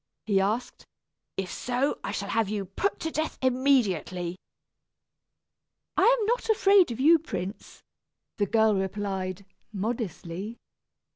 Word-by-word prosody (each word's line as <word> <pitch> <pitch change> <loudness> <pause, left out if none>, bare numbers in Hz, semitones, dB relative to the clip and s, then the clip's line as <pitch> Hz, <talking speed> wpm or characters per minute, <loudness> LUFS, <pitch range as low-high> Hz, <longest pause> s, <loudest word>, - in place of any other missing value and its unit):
he 200 -3 +3
asked. 215 +6 -2 0.5
"If 185 -2 -3
so, 250 +3 -1
I - - -3
shall 200 -1 -4
have 225 -3 +1
you 205 -2 -2
put 280 - -2
to 320 - -2
death 315 0 -2
immediately." 230 - +1 1.6
"I - - +4
am 430 - 0
not 480 +2 0
afraid 395 -5 +5
of 235 - -5
you, 320 +5 +6
prince," 195 - -6 0.5
the 205 -2 +1
girl 220 +1 +4
replied, 190 -1 -3 0.3
modestly. 210 -1 -4
215 Hz, 125 wpm, -27 LUFS, 195-265 Hz, 1.6 s, you